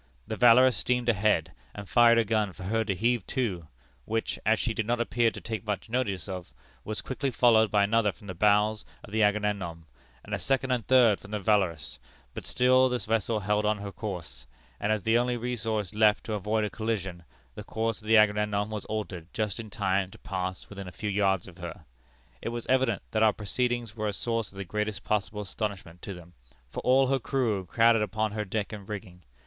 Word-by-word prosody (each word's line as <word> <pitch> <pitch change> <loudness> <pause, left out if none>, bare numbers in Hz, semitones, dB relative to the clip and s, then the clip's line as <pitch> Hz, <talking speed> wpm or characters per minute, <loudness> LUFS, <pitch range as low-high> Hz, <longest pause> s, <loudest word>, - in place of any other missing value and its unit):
The 110 - -4
Valorous 125 +2 +6
steamed 125 -1 +1
ahead, 100 -7 +2 0.2
and 100 -1 -8
fired 120 +1 +6
a 115 - +3
gun 105 -2 0
for 95 - -10
her 110 +4 0
to 100 -2 -1
heave 115 +3 +1
to, 100 - -2 0.4
which, 115 +1 -2
as 110 +1 +4
she 115 - -1
did 110 -1 -2
not 120 0 +1
appear 120 0 +2
to - - -9
take 110 -2 -5
much 105 +1 -4
notice 100 -9 -1
of, 90 -2 -6 0.3
was 110 0 -3
quickly 135 +1 -2
followed 115 -3 +4
by 105 -1 +3
another 105 0 +2
from 105 - -18
the 95 - -5
bows 105 +3 +2 0.2
of - - -12
the 110 +1 +1
Agamemnon, 105 -6 0 0.4
and 105 - -8
a 100 - -1
second 135 +4 0
and 125 -3 -1
third 120 -6 +5
from 105 - -13
the 105 0 -2
Valorous, 95 -7 0 0.3
but - - -6
still 130 +1 +4
the 125 - 0
vessel 110 -1 -1
held 105 +2 +1
on 105 0 +1
her 100 -1 -6
course; 85 - -7 0.3
and 105 - 0
as 110 -3 0
the 115 +1 +3
only 125 0 0
resource 110 -5 -2
left 105 0 +3
to 110 - -4
avoid 105 +2 0
a 105 - -2
collision, 95 -6 -3 0.3
the - - -8
course 115 0 -2
of 110 - -13
the 110 0 +6
Agamemnon 105 0 +2
was 105 -2 -4
altered 100 -6 -5
just 105 0 -2
in 110 -2 -7
time 95 -2 0
to - - -14
pass 95 -2 -4
within 100 -2 -8
a - - -7
few 105 +4 -4
yards 95 -2 +1
of 90 0 -14
her. 85 -2 -8 0.6
It - - -3
was 120 0 -5
evident 130 -5 +1
that 110 - 0
our 110 -1 +5
proceedings 120 +1 -2
were 110 -1 -2
a 105 - -1
source 115 0 -2
of 95 - -15
the 100 - -5
greatest 105 +2 -3
possible 105 0 -1
astonishment 100 -4 -5
to 100 - -6
them, 90 0 -13 0.4
for - - -4
all 130 +2 +4
her 135 0 +2
crew 115 -8 -1
crowded 115 +2 +4
upon 110 +1 -1
her 105 0 -3
deck 105 +3 -3
and 100 -2 -9
rigging. 95 -4 -7
105 Hz, 215 wpm, -28 LUFS, 100-115 Hz, 0.6 s, Valorous